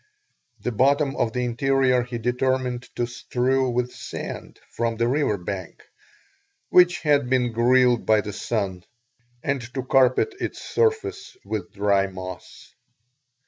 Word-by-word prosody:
The 125 - -2
bottom 140 +4 +2
of 115 - 0
the 125 +1 -1
interior 130 +1 +2
he 120 0 -5
determined 125 +1 -1
to 120 - 0
strew 125 +2 0
with 125 0 -1
sand - - -7
from 115 -1 -2
the 115 +1 +1
river 135 -5 +1
bank 90 0 -6 0.9
which 180 -1 +5
had 145 -5 +2
been 125 -2 +2
grilled 120 +1 +3
by 110 -1 +3
the 105 -1 -6
sun, 95 -6 -3 0.6
and 140 -1 -1
to 130 - -2
carpet 130 - +3
its - - -4
surface 415 -3 -1
with 105 -5 -4
dry 100 -1 +2
moss. 95 -1 -9
125 Hz, 135 wpm, -24 LUFS, 115-135 Hz, 0.9 s, which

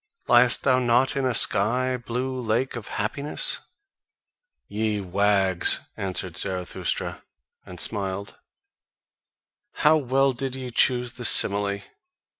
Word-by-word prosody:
Liest 120 0 +4
thou 130 -2 +3
not 125 +3 +2
in 135 -1 -1
a 125 - -1
sky 125 +6 +3
blue 125 +2 -4
lake 120 +3 -1
of 115 -3 -7
happiness?" 140 +8 -2 1.1
"Ye 105 0 -2
wags," 95 -1 +2
answered 95 -3 -3
Zarathustra, 90 -2 -4 0.4
and 90 -1 -10
smiled, 100 -1 -2 1.5
"how 155 +1 +6
well 135 -1 +1
did 130 +1 -4
ye 130 -2 -7
choose 125 0 +2
the 125 0 -7
simile! 100 -1 +3
120 Hz, 110 wpm, -24 LUFS, 100-130 Hz, 1.5 s, how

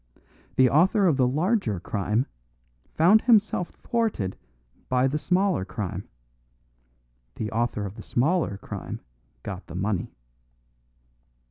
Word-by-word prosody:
The 130 - +6
author 185 - +4
of 160 -7 +3
the 130 -2 +4
larger 150 - +1
crime 105 +6 -1 0.7
found 190 +7 +6
himself 215 -6 +3
thwarted 220 - -2 0.5
by 125 0 +3
the 150 +3 -1
smaller 185 - +1
crime; 95 -1 -5 1.3
the 110 -1 -4
author 115 -2 -1
of 95 - -6
the 110 - -10
smaller 135 - 0
crime - - -7 0.4
got 95 -2 -6
the 85 - -9
money." 95 -1 -2
130 Hz, 115 wpm, -26 LUFS, -, 1.3 s, The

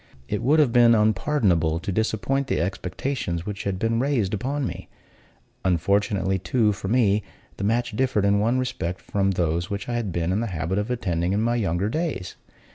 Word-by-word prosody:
It 105 - -2
would 140 +6 +3
have 145 -7 +3
been 120 -1 +6
unpardonable 105 - +2
to 100 +3 -4
disappoint 110 +6 0
the - - 0
expectations 90 - -3
which 105 -1 -5
had 100 -2 -1
been 115 +3 0
raised 120 -8 0
on 140 +1 -1
me. - - -6 0.7
Unfortunately, 95 +2 +1
too, 110 +3 +2
for 95 0 -6
me, 105 -2 +3 0.4
the - - -5
match 115 +2 0
differed 125 -5 +1
in 100 0 +3
one 115 +5 +2
respect 95 -9 -2
from 100 -1 0
those 85 -1 0
which 100 0 -4
I 120 - -2
had 115 -5 -2
been 85 +1 -1
in 95 - +1
the 115 - -1
habit 90 +1 -2
of 105 +3 -3
attending 90 -7 -1
in 105 +2 +1
my 120 +1 +1
younger 95 -4 0
days. 155 - -3
105 Hz, 190 wpm, -24 LUFS, 95-120 Hz, 0.7 s, been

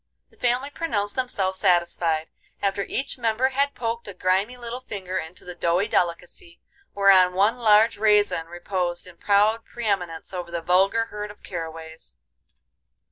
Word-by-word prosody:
The - - -24
family 250 +4 0
pronounced 205 -12 -1
themselves 195 -7 0
satisfied, 170 -2 +1 0.3
after 200 0 0
each 265 +5 -4
member 230 +3 +1
had 280 +2 0
poked 230 -1 -3
a 200 - -8
grimy 190 +7 0
little 240 0 -6
finger 185 -6 -5
into 170 +2 -9
the 180 - -7
doughy 175 +3 +1
delicacy, 170 0 -2 0.4
whereon 190 -2 +5
one 210 +6 +2
large 220 -1 +4
raisin 210 -6 +3
reposed 175 0 -3
in 180 -2 -14
proud 210 +4 +2
pre 240 -1 -8
eminence 180 -5 -2
over 180 -2 -5
the 170 -1 -4
vulgar 195 +6 +3
herd 210 0 -5
of 205 - -14
caraways. 160 - -8
195 Hz, 150 wpm, -24 LUFS, 175-225 Hz, 0.4 s, whereon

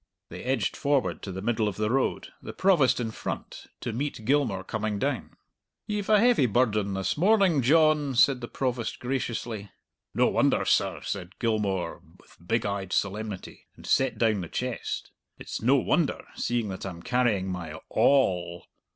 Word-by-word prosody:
They - - -8
edged 125 -5 -1
forward 140 -2 0
to 95 - -6
the 95 +1 -6
middle 115 -2 +1
of 100 - -3
the 105 +1 -1
road, 135 +1 0
the - - -8
Provost 175 -11 +3
in 115 -2 -2
front, - - -6
to 120 - -3
meet 130 -3 -4
Gilmour 130 -8 +1
coming 110 -1 -2
down. 130 0 -2 0.5
"Ye've 210 -1 -3
a 210 -1 +6
heavy 235 - +4
burden 105 -4 +1
this 95 +7 -1
morning, 190 -4 +4
John," 150 0 +3
said 125 +1 +4
the 120 - -5
Provost 125 -3 -2
graciously. 120 -5 -3 0.5
"No - - +4
wonder, - - +2
sir," - - +1
said 95 -1 -5
Gilmour, 100 -7 -1 0.2
with - - -21
big 115 +2 +1
eyed 100 -2 -3
solemnity, 105 -1 -3
and - - -14
set 135 -1 +2
down 110 -4 +2
the 85 - -5
chest; 125 -1 -4 0.3
"it's - - -6
no 125 +5 +4
wonder, 150 +3 +1
seeing 120 -3 -1
that 95 - -6
I'm 90 -3 -7
carrying 120 -7 +1
my 90 -3 -5
a 80 - -7
all." 90 -11 +2
115 Hz, 170 wpm, -27 LUFS, 100-135 Hz, 0.5 s, a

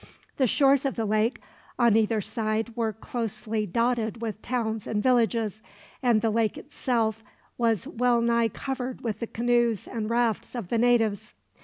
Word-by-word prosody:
The 260 - +3
shores 275 +2 +4
of 275 - -1
the 225 - -1
lake 215 +3 +1 0.4
on 235 -3 +4
either 220 0 +2
side 220 +2 -2
were 225 -2 0
closely 220 -1 -3
dotted 230 +2 0
with 220 -2 -4
towns 225 -3 -2
and 210 -1 -1
villages, 230 -4 +2 0.4
and 240 -4 +3
the 225 - +2
lake 225 -1 +1
itself 225 -6 -1 0.3
was 230 -5 +1
well 245 0 +2
nigh 235 0 +2
covered 255 +2 -5
with 220 -3 -3
the 230 - -3
canoes 240 -2 +1
and 220 -2 -4
rafts 235 0 0
of 225 -7 -5
the 230 - +1
natives. 225 -3 +2
230 Hz, 160 wpm, -26 LUFS, 220-240 Hz, 0.4 s, shores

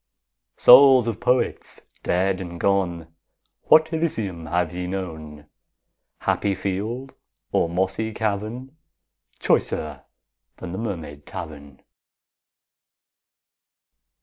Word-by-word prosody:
Souls 130 -1 +8
of 115 -2 -3
Poets 125 +1 -1 0.2
dead 95 +1 0
and 85 -2 -7
gone, 85 -5 0 0.5
What 160 +1 +5
Elysium 105 - -2
have 85 -1 -1
ye 90 0 -4
known, 80 -5 -6 0.8
Happy 100 -1 0
field 105 +8 -4 0.4
or 85 - +1
mossy 95 +5 -1
cavern, 110 +6 -4 0.6
Choicer - - -1 0.5
than 90 - -7
the 95 - -5
Mermaid 80 -10 -6
Tavern? 70 -4 -9
95 Hz, 90 wpm, -23 LUFS, 85-115 Hz, 0.8 s, Souls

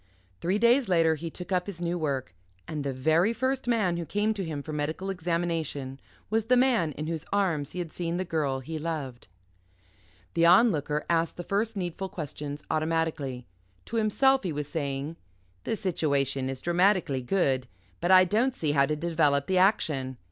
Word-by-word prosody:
Three 185 +4 0
days 235 +2 +4
later 165 -3 +4
he 165 +2 -5
took 180 +3 -8
up 180 0 +1
his 195 -4 -7
new 175 0 -1
work. 135 - -2 0.3
And 150 -2 -4
the 140 - -1
very 160 - +2
first 260 +2 -1
man 210 -8 +2
who 170 - -2
came 210 +2 +1
to 200 -2 -4
him 155 -4 -4
for 155 - -6
medical 155 +6 -2
examination 165 -6 -2 0.3
was 220 0 +1
the 250 +2 +4
man 235 - +3
in 155 - -5
whose 160 -1 -4
arms 175 -8 0
he - - -7
had 175 -3 -4
seen 170 -1 -2
the 185 - -2
girl 145 -6 -1
he 160 +4 -5
loved. 150 -6 -5 1.1
The 165 - +2
Onlooker 170 - +4
asked 165 -1 +1
the 175 - -5
first 210 +4 -1
needful 185 +1 -3
questions 150 -3 -6
automatically. 155 -5 -1 0.4
To 230 - -4
himself 265 +5 +3
he 185 - -3
was 145 -1 -4
saying: 145 0 -3 0.5
"The - - 0
situation 140 -8 0
is 135 -1 -5
dramatically 175 -5 +2
good; 130 -3 +1 0.3
but 175 - -1
I 185 0 +8
don't 235 +7 +1
see 155 - -1
how 140 -1 +3
to 150 - 0
develop 150 -3 +1
the 185 +2 +2
action. 140 - +1
165 Hz, 180 wpm, -28 LUFS, 145-190 Hz, 1.1 s, I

